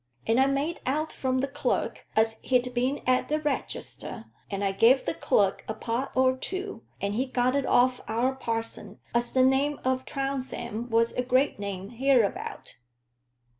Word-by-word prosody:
And 225 +3 +3
I 265 - +5
made 280 +5 -1
out 305 +4 0
from 260 -1 0
the 275 - 0
clerk - - -2
as 220 0 +2
he'd 250 -1 +1
been 255 +4 0
at 255 0 +2
the 305 +1 +1
regester; 295 -2 -4 0.2
and 200 0 -3
I 195 - +2
gave 230 +7 +4
the 170 - 0
clerk 195 +2 +1
a 220 - -3
pot 240 +4 -2
or 260 0 +4
two, 375 - -4 0.2
and 200 0 -1
he 255 +5 0
got 255 0 +1
it 280 - 0
off 250 +1 +3
our 240 +4 +1
parson 230 -3 -3 0.2
as 240 0 +1
the 260 - +4
name 275 +3 +2
o' 260 0 +2
Trounsem 260 -4 -4
was 230 0 +2
a - - 0
great 255 0 +2
name 200 0 -5
hereabout. 245 -3 0
255 Hz, 170 wpm, -27 LUFS, 230-270 Hz, 0.2 s, I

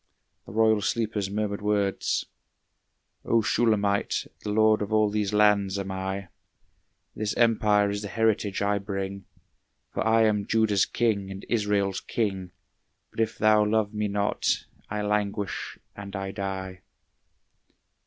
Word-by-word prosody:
the - - -9
royal 110 0 +3
sleeper's 110 -3 -1
murmured 100 0 -2
words: 105 -2 0 1.0
"O 115 -1 +2
Shulamite, 105 -3 +1 0.2
the - - -5
lord 110 0 +4
of 105 +1 -3
all 110 -1 +3
these 105 -1 -1
lands 105 -2 +3
am 100 -1 -4
I, 95 0 -4 0.9
This 105 -1 -2
empire 105 -3 +3
is 100 0 -3
the 105 - -5
heritage 105 -2 0
I 100 0 +1
bring, 95 -1 -5 0.7
For - - -1
I 110 0 +4
am 105 -2 +1
Judah's 110 -3 +2
king 105 -5 0
and 95 0 -8
Israel's 105 -4 0
king; 95 -5 -2 0.6
But - - -10
if 110 -1 0
thou 110 0 +4
love 105 0 +1
me 105 0 -1
not, 100 0 0 0.2
I 105 0 -2
languish 105 -1 -2 0.2
and 100 0 -8
I 95 0 -3
die." 95 -2 -5
105 Hz, 135 wpm, -26 LUFS, 100-110 Hz, 1.0 s, lord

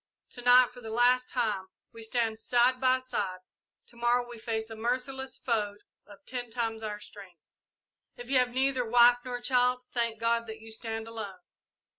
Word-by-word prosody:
To 245 - -7
night, 245 0 +6
for 245 - -12
the 225 - -8
last 245 +2 +3
time, 210 -6 -1 0.3
we 230 - -11
stand 225 -1 -1
side 250 +2 +2
by 255 0 +4
side 205 -8 -3 0.5
to 240 - -18
morrow 240 +1 +1
we 240 -1 -10
fight 220 -1 -3
a - - -6
merciless 255 +3 -2
foe 210 -4 -1 0.3
of 205 +8 -16
ten 245 -2 -4
times 225 -1 -3
our 210 -1 -4
strength! 195 -4 -12 0.8
"If 245 - -9
you 265 0 +3
have 250 0 +2
neither 260 0 +1
wife 240 +1 +6
nor 245 -1 -4
child, 250 0 +2
thank 230 -2 0
God 230 0 +1
that 220 0 -7
you 225 0 -12
stand 225 0 -4
alone. 210 -5 -7
240 Hz, 180 wpm, -29 LUFS, 220-250 Hz, 0.8 s, night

